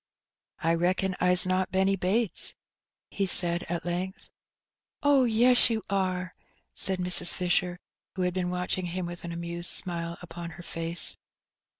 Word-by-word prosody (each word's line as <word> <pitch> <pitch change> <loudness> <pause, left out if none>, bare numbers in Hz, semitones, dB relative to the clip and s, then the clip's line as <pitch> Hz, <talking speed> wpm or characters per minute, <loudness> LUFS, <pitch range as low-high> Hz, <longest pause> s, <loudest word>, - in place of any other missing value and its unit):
I 165 +1 +2
reckon 185 +2 0
Fs 180 0 +4
not 185 0 0
Benny 190 +1 +2
Bates," 195 +3 0 0.6
he 200 -1 -1
said 175 -1 +5
at 170 0 -3
length. 180 +2 -5 0.7
Oh, 285 -3 +4
yes, 240 +2 +5
you 225 -2 -2
are," 185 -2 -1 0.4
said 190 -1 0
Mrs. 180 -1 +3
Fisher, 180 0 -1 0.4
who 185 - -2
had 180 0 0
been 180 -1 -2
watching 180 0 -2
him 180 +1 -4
with 175 0 -8
an 170 - -5
amused 170 +1 -2
smile 170 -1 -2
upon 170 0 -8
her 175 - -10
face. 165 0 -1
180 Hz, 150 wpm, -27 LUFS, 175-190 Hz, 0.7 s, said